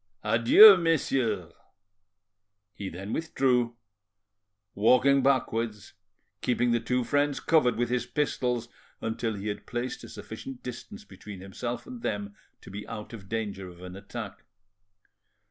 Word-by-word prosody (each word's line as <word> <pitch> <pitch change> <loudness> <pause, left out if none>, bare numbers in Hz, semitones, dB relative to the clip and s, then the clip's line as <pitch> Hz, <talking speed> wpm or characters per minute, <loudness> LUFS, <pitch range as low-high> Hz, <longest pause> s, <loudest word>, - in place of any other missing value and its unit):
Adieu, 115 - +8
messieurs." 155 -8 0 1.2
He 100 -2 -6
then 95 +5 -6
withdrew, 125 -7 0 1.0
walking 125 +6 +4
backwards, 115 -6 0 0.5
keeping 120 -1 +1
the 120 - +2
two 125 +2 0
friends 145 +3 +1
covered 155 -7 +3
with 120 0 -1
his 125 -1 -1
pistols 125 -3 -1 0.3
until 115 0 -2
he 100 +1 -6
had 105 - -5
placed 120 +2 -4
a - - -10
sufficient 135 -2 -9
distance 205 - -8
between 105 - -11
himself 110 +6 -5
and 250 -2 -9
them 100 - -3 0.3
to - - -12
be 100 +2 -7
out 105 +2 -7
of 95 -4 -10
danger 105 -4 -4
of 90 0 -14
an 90 0 -8
attack. 100 +1 -8
120 Hz, 130 wpm, -28 LUFS, 105-130 Hz, 1.2 s, Adieu